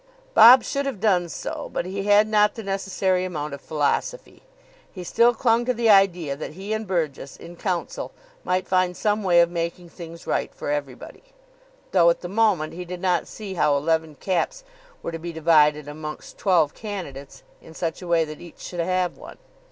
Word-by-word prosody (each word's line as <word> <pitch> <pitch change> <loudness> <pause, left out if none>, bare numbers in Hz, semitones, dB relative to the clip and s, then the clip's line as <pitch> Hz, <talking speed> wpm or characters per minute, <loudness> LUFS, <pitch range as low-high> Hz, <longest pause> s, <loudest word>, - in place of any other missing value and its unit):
Bob 250 - +9
should 275 0 -2
have 265 -8 -4
done 180 -5 +2
so, - - -6
but - - -2
he 195 +2 -4
had 205 +1 +5
not 210 -1 +3
the 225 - -7
necessary 195 -1 -1
amount 150 -5 -4
of 140 - -8
philosophy. 160 - -2 0.5
He 185 - -8
still 235 +7 +4
clung 230 0 +2
to 250 0 0
the 230 -1 +3
idea 180 -7 +3
that 150 - -7
he 195 +5 -5
and 220 -1 -3
Burgess, 155 -7 -3
in 170 +1 -11
council, 180 -1 -3 0.3
might 185 0 -1
find 185 -1 +1
some 210 0 0
way 175 -3 +5
of 170 0 +2
making 170 +1 -4
things 170 -1 -11
right - - -1
for - - -4
everybody. 140 -4 -5 0.7
Though, 170 -3 +5
at 170 - 0
the 175 - -5
moment, 195 -6 +1
he 180 +2 -6
did 180 0 -7
not 180 -2 0
see 205 -3 -8
how 150 -5 +2
eleven 160 +1 -1
caps - - -2 0.4
were - - -3
to 165 - -6
be 170 +1 -6
divided 150 -2 +3
amongst 150 +1 -8
twelve 170 -7 +2
candidates 170 -11 -8 0.2
in 160 - -15
such 165 +1 -3
a 180 - -8
way 170 -1 +2
that 155 0 -10
each 175 - -12
should 175 - -7
have 180 +1 -1
one. - - -11
180 Hz, 190 wpm, -23 LUFS, 160-200 Hz, 0.7 s, Bob